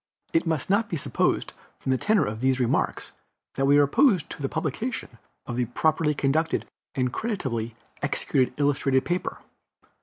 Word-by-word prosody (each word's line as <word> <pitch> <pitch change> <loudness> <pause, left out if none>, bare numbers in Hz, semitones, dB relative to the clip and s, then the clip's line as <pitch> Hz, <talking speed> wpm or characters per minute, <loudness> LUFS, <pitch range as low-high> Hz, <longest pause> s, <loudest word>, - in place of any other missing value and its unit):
It 165 +1 +2
must 160 -5 0
not 205 +3 +2
be 170 - -1
supposed 140 - 0 0.2
from 130 - -2
the 130 - +3
tenor 210 -1 +3
of 110 +1 -4
these 130 +1 +2
remarks 120 -2 0 0.4
that 135 - 0
we 145 +1 +6
are 145 - +7
opposed 190 - +3
to - - -7
the 135 - -1
publication 160 - -3 0.3
of 120 0 -3
a 125 - +2
properly 150 +5 +1
conducted 155 +4 +1 0.3
and 125 -2 0
creditably 125 - -2 0.3
executed 135 -3 0
illustrated 140 -2 +2
paper. 175 +1 -2
145 Hz, 160 wpm, -26 LUFS, 130-165 Hz, 0.4 s, are